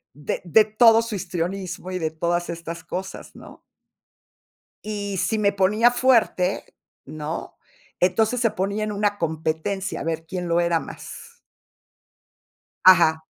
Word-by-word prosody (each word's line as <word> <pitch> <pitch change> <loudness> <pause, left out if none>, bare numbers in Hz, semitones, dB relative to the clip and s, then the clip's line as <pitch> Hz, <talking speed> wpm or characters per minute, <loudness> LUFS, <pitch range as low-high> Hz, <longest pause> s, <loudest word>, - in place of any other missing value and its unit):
de 145 0 -4
de 215 +6 +5
todo 225 +1 +5
su 230 -1 -6
histrionismo, 185 0 -4
y, 185 - -3
de 160 -1 -1
todas 170 +2 -2
estas 170 0 -6
cosas 190 +1 -7
¿no? - - -14 1.3
Y 205 -2 -4
si 220 +4 0
me 205 -1 +3
ponía 210 +5 +3
fuerte, 235 -7 +1 0.3
¿no? 155 +2 -6 0.4
Entonces 220 +7 +2
se 230 - +3
ponía 200 +3 -2
en 210 - -3
una 205 0 0
competencia 165 +4 -3
a - - -5
ver 165 0 -3
quién 180 0 -4
lo 170 0 +2
era 170 -1 +2
más. 465 - -11 1.4
Ajá. 160 -4 +6
185 Hz, 135 wpm, -23 LUFS, 170-210 Hz, 1.4 s, Ajá